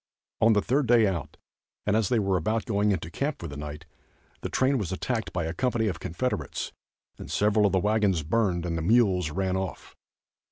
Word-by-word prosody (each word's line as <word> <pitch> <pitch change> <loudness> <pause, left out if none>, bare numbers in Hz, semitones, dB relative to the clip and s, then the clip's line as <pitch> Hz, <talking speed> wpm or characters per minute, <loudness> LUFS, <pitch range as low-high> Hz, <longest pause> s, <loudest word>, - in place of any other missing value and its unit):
On 110 0 +6
the 105 - +2
third 135 +2 +1
day 115 -1 +5
out 85 -7 -3 0.5
and 105 - +2
as 110 -3 +2
they 120 - +2
were 100 -3 +1
about 110 +7 0
going 105 -3 +1
into 85 -3 -2
camp 140 - -2
for 85 - -6
the 70 - -8
night, 75 +2 -7 0.6
the - - -4
train 130 0 +2
was 95 -4 -3
attacked 110 +4 -2
by 85 -2 -2
a 80 - -3
company 120 +3 0
of 90 -7 -2
Confederates 85 - -3 0.5
and - - -8
several 105 0 +3
of - - -1
the 95 - +3
wagons 105 -4 +2
burned 90 0 0
and 85 -1 -2
the 80 - -2
mules 95 -3 +3
run 95 +4 -1
off. 95 -1 -5
100 Hz, 205 wpm, -27 LUFS, 85-110 Hz, 0.6 s, On